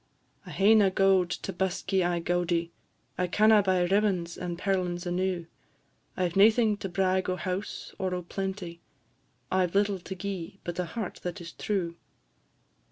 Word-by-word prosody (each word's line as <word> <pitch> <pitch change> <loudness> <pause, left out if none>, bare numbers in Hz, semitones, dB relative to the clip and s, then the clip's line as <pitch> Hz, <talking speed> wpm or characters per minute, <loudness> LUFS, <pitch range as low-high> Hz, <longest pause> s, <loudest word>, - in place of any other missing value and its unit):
"I - - -8
hae 200 +3 +4
na 210 -3 +5
gowd 190 -1 +3
to - - -4
busk 190 +1 -2
ye 190 - +4
aye 175 -1 +1
gaudie; 170 -1 0 0.5
I 180 - +1
canna 215 +3 +5
buy 185 -2 +2
ribbons 185 -3 +1
and 175 -1 -4
perlins 180 -2 -1
enew; 180 -1 -1 0.7
I 185 - +2
've 170 - -8
naething 215 +2 +5
to 195 - -5
brag 185 0 +1
o' 185 - 0
house, 185 +2 -4
or 185 -1 -1
o' 180 - -4
plenty, 190 -2 -5 0.7
I 185 -1 +3
've 170 - -13
little 200 -1 +2
to 190 +2 -7
gi'e, 190 -1 -5
but 175 0 -5
a 180 - 0
heart 205 +3 -5
that 175 -1 -4
is 170 -1 -8
true. 175 -5 -2
185 Hz, 170 wpm, -28 LUFS, 175-195 Hz, 0.7 s, na